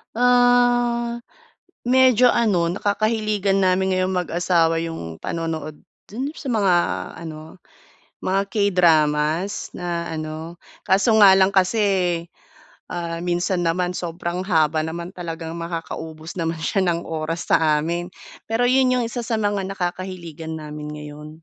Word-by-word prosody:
Ah, 245 -1 +3 0.7
medyo 255 -1 +5
ano, 185 -8 +2
nakakahiligan 205 0 0
namin 190 0 +2
ngayon 185 0 0
mag-asawa 170 -2 +1
'yong 160 - -6
panonood 160 -2 -4 0.3
dun 255 +7 -4
yung - - -14
sa 275 - -6
mga 200 -6 +3 0.5
ano, 160 +1 -9 0.6
mga 195 +1 +1
K-dramas 170 -3 +2
na 170 -1 -3
ano 160 +1 -6 0.3
kaso 200 +4 +3
nga 190 -1 +8
lang 190 +1 +3
kasi, 190 -3 +2 0.7
ah, 170 -1 -3
minsan 175 0 0
naman 180 +2 0
sobrang 175 +1 -4
haba 155 -3 +2
naman 170 +2 -5
talagang 165 -1 -6
makakaubos 165 -1 -6
naman 165 -1 -2
siya 195 +3 +1
ng 170 -1 0
oras 160 +1 -4
sa 155 -2 +4
amin. 175 +2 -3 0.3
Pero, 230 +2 +1
'yon 255 0 +4
'yong 240 - 0
isa 240 +1 -4
sa 230 - -3
mga 205 -2 0
nakakahiligan 175 -4 -5
namin 150 0 -7
ngayon. 150 0 -9
175 Hz, 125 wpm, -22 LUFS, 165-205 Hz, 0.7 s, nga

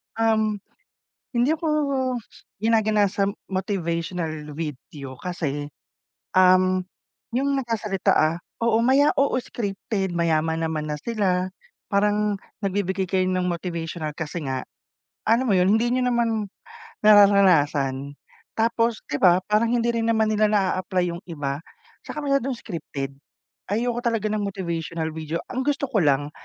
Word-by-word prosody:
Um, 220 -2 +1 0.8
hindi 245 +6 +3
ako 320 0 -2 0.9
ginaganasam 210 -2 +2 0.2
motivational 170 -4 -2
video 145 -3 -6
kasi, 145 -5 -3 0.7
um- 185 0 +5 0.6
yung 280 +2 +1
nagsasalita, 215 -5 -1
ah- 155 +2 +2 0.3
oo, 230 -1 +3
maya 270 +4 +4
oo, 275 -2 +2
scripted, 205 -4 -3
mayaman 160 -1 +1
naman 155 -1 -3
na 150 - -2
sila, 185 -1 0 0.5
parang, 210 0 +2 0.2
nagbibigay 190 -1 0
kayo 185 +1 +1
ng 185 -1 0
motivational 170 -3 -4
kasi 160 -2 -4
nga, 130 -1 -3 0.6
alam 235 +3 +4
mo - - +4
'yon, 185 +3 +4
hindi 240 +2 +1
niyo 250 0 +2
naman 230 -4 0 0.6
nararanasan, 155 -10 +5 0.4
tapos, 230 0 +1
'di 145 - -1
ba, 180 0 +6
parang 215 +2 +2
hindi 235 -1 +2
rin 230 -1 0
naman 220 -1 +2
nila 215 0 +3
na-a-apply 185 -3 +1
yung 170 - -6
iba, 145 -3 -3 0.4
tsaka 300 - -5
masyadong 275 -2 +1
scripted. 140 -9 -5 0.6
Ayoko 235 +3 0
talaga 225 -3 0
ng 215 - 0
motivational 170 -4 -3
video, 160 +1 -4
ang 255 - -2
gusto 285 0 0
ko 230 -6 +1
lang 145 -2 +2
195 Hz, 125 wpm, -24 LUFS, 165-225 Hz, 0.9 s, ba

